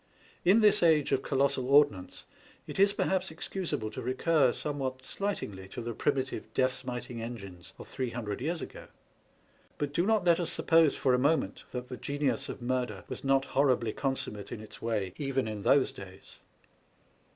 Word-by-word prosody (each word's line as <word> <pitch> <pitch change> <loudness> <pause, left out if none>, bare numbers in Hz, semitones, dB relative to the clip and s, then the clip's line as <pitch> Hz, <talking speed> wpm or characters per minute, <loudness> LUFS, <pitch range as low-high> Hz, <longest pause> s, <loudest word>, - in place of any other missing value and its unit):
In 200 +6 +5
this 210 -1 +5
age 160 -4 +4
of 135 -1 +2
colossal 135 -2 0
ordnance, 140 -10 +3 0.4
it - - -7
is 200 +1 +6
perhaps 190 -4 0
ex 160 - -6
cusable 165 - -3
to - - -5
recur 130 +2 +2
somewhat 130 -3 -4
slightingly 105 - -4
to 95 - -8
the 120 0 -3
primitive 135 +1 -1
death 130 0 +3
smiting 125 -2 -6
engines 100 -7 -8
of - - -10
three 130 -2 -3
hundred 115 -3 -4
years 165 +4 -2
ago. - - -10 0.9
But 145 -1 -2
do 175 +6 +1
not 220 -4 +2
let 170 -1 +5
us 175 - -1
suppose 165 -3 +4
for 130 - +2
a 125 - +3
moment 145 -7 +1
that 125 0 -5
the 125 - -7
genius 140 0 -1
of 125 - -7
murder 125 -5 -2
was - - -6
not 135 0 +3
horribly 130 -5 +2
consummate 130 -7 -3
in - - -5
its 110 0 -11
way 105 -5 -1
even 135 -4 -1
in 105 -2 -4
those 135 +6 +4
days. 95 0 -12
130 Hz, 175 wpm, -30 LUFS, 115-150 Hz, 0.9 s, is